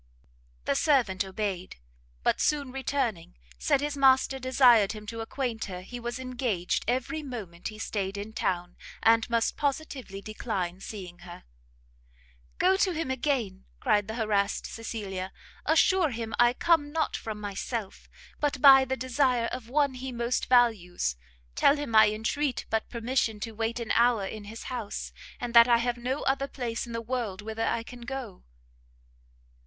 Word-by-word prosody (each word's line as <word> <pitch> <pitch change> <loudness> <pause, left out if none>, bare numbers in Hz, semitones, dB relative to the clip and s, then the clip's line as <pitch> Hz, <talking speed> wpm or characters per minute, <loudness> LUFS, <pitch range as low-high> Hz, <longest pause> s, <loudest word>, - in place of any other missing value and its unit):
The - - +2
servant 215 - +2
obeyed; 190 -2 -4 0.5
but - - +2
soon 285 -3 +1
returning, 255 - -2 0.2
said 265 - +2
his 295 0 -2
master 265 -1 +4
desired 250 -5 +5
him 210 -1 -9
to 230 +2 -5
acquaint 230 -1 -3
her 180 -2 -6
he 245 +6 -8
was 240 +1 -4
engaged 245 -8 -2
every 260 +6 -1
moment 210 - -7
he 215 - -7
stayed 200 -2 -3
in 205 +2 -6
town, 175 -4 -2 0.3
and 225 +1 +4
must 230 -1 +1
positively 275 -8 -3
decline 195 -4 -4
seeing 185 -4 -8
her. 175 0 -11 1.1
"Go 380 +1 +4
to 380 -2 +2
him 315 -5 -2
again," 240 -8 -1
cried 205 -1 +2
the 220 - -5
harassed 210 -3 0
Cecilia, 195 -5 -5 0.4
"assure 325 +2 +4
him 225 -2 -5
I 240 0 +6
come 290 0 +2
not 320 +1 0
from 215 -1 -5
myself, 205 +1 -5 0.3
but 290 -3 0
by 270 -1 +8
the 265 +1 -2
desire 255 -1 +1
of 250 -2 -6
one 285 0 +2
he 260 +1 -6
most 240 +1 -1
values: 210 - +2 0.4
tell 280 - +4
him 285 -6 -3
I 215 -1 +8
entreat 245 +6 -1
but 220 0 0
permission 235 -2 -1
to 230 - -4
wait 225 +2 -2
an 235 - -3
hour 235 -4 +3
in 210 +1 -7
his 220 +2 -8
house, 235 -5 -5 0.3
and 240 -1 -4
that 235 0 +9
I 240 -1 +5
have 240 +1 -1
no 255 +4 -2
other 275 +1 +1
place 240 -4 -4
in - - -8
the 230 0 -3
world 230 -5 -3
whither 220 +1 -2
I 230 - 0
can 245 +1 -11
go!" 245 -5 -6
235 Hz, 160 wpm, -28 LUFS, 210-260 Hz, 1.1 s, that